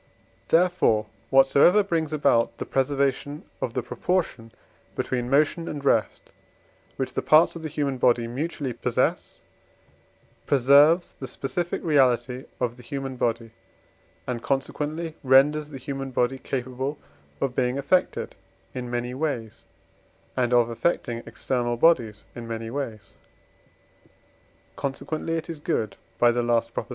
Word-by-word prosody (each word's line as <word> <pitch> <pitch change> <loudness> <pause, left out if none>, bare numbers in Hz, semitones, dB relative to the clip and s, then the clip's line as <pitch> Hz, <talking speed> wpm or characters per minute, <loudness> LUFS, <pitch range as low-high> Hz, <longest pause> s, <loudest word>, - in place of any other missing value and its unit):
Therefore, 170 -11 +3 0.2
whatsoever 140 +9 +5
brings 165 -5 -1
about 130 -6 +2
the - - -4
preservation 140 +2 -1 0.2
of 120 - -3
the 125 - -1
proportion 125 -2 -2 0.4
between 125 -1 -2
motion 155 +4 +2
and 145 -2 -5
rest, 115 -5 +1 0.6
which - - -3
the - - -1
parts 155 +3 +5
of 165 - -7
the 160 - -4
human 140 -3 -2
body 120 -1 +3
mutually 135 +2 -3
possess, - - -1 1.1
preserves 145 +6 +5
the 130 - -5
specific 150 +8 -3
reality 130 -4 +2
of 120 -1 -2
the - - -12
human 135 +1 -5
body, 115 -2 -1 0.7
and 120 -2 -3
consequently 150 +5 -2
renders 145 +3 +4
the 140 - -8
human 135 +1 -5
body 125 +1 0
capable 130 +3 -3 0.4
of 135 -2 -1
being 125 0 0
affected 180 +7 0 0.4
in 125 -1 -5
many 120 +1 -3
ways 130 -6 -3 0.7
and 125 -2 +1
of 120 -1 +4
affecting 115 -2 -1
external 120 -2 -2
bodies 115 -9 +2
in 120 -1 -8
many 115 0 -5
ways; 120 -6 -5 1.6
consequently 155 +4 -3
it 160 - -5
is 165 -3 -6
good 110 -8 -2 0.2
(by 120 0 +5
the 120 +1 0
last 120 -1 0
Prop.). - - -4
135 Hz, 130 wpm, -25 LUFS, 120-150 Hz, 1.6 s, whatsoever